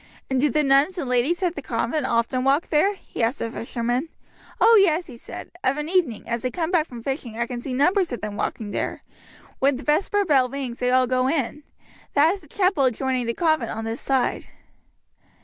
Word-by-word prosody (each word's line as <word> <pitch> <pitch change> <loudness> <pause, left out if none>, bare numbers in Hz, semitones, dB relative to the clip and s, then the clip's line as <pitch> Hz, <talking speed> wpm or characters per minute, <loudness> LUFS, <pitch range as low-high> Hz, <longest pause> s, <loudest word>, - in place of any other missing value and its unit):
"And 260 - +2
do 295 +3 +3
the 300 +4 +1
nuns 280 +7 +3
and 330 - -2
the 250 - -4
ladies 290 +10 +1
at 350 -2 +1
the 290 - -6
convent 255 +3 -1
often 235 +2 0
walk 275 +5 +2
there?" 360 +7 +3
he 380 - -8
asked 230 +5 +1
the 230 - -3
fisherman. 240 +5 -2 0.5
"Oh 460 - +7
yes," 345 -2 +2
he 265 - -11
answered; 235 - -9
"of 265 +2 +1
an 300 0 -3
evening 330 - 0
as 235 -1 -2
I 255 - 0
come 325 +5 -2
back 330 -3 +2
from 235 -2 -9
fishing 260 -4 -4
I 235 - 0
can 240 0 -6
see 265 - -6
numbers 350 +8 +2
of 245 - -3
them 210 -1 -5
walking 210 0 -3
there. - - -3 0.6
When 275 +1 +3
the 260 - -7
vesper 390 +7 +1
bell 270 -6 +3
rings 260 -3 -5
they 250 - +1
all 255 0 +4
go 255 +1 +1
in. 280 0 -1 0.5
That 300 +3 +5
is 395 - -7
the 310 - -17
chapel 365 -3 +2
adjoining 255 0 0
the 235 - -1
convent 315 -8 +1
on 225 - -5
this 225 +2 -4
side." 265 -2 0
270 Hz, 220 wpm, -23 LUFS, 245-315 Hz, 0.6 s, Oh